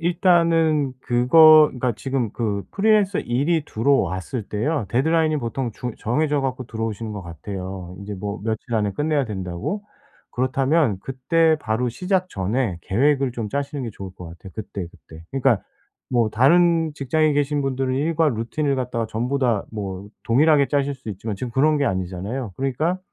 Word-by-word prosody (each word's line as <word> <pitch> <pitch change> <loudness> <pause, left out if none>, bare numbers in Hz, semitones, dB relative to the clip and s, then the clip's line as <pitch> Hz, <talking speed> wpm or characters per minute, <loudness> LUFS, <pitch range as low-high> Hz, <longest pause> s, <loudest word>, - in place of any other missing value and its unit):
일단은 165 -4 +3
그거 155 +6 +7
그러니까 125 -1 -2
지금 130 -4 -2
그 105 -4 -2
프리랜서 205 -2 +2
일이 145 +7 0
들어왔을 115 -3 0
때요. 115 +8 -1
데드라인이 155 +4 +2
보통 120 -1 -3
중 120 +2 -5
정해져 145 +5 0
갖고 130 -2 -3
들어오시는 110 -1 -4
거 100 - -6
같아요. 90 +2 -7
인제 100 +1 -6
뭐 100 +2 -5
며칠 110 +1 -3
안에 105 -2 +1
끝내야 150 +3 0
된다고. 95 - -4 0.5
그렇다면 130 - +1
그때 160 - +2
바로 120 -2 -1
시작 185 - -1
전에 100 - -1
계획을 135 +4 +1
좀 115 -3 -4
짜시는 140 +3 -3
게 115 - -4
좋을 95 -2 -9
것 90 - -10
같아요 85 +3 -12
그때그때. 85 -6 -8
그러니까 135 -5 +2 0.5
뭐 120 -3 +2
다른 165 +6 +4
직장에 150 +3 +1
계신 145 0 +1
분들은 130 -1 -1
일과 160 +2 +2
루틴을 135 +4 -1
갖다가 125 -3 -2
전부 120 +5 -2
다 120 -6 +1
뭐 100 -2 -5 0.2
동일하게 145 +3 +4
짜실 140 -1 0
수 130 -4 -12
있지만 105 +1 -4
지금 125 +4 -5
그런 150 +6 +3
게 145 - +1
아니잖아요. 95 +5 -3
그러니까 145 +7 -1
130 Hz, 365 characters per minute, -22 LUFS, 110-150 Hz, 0.5 s, 그거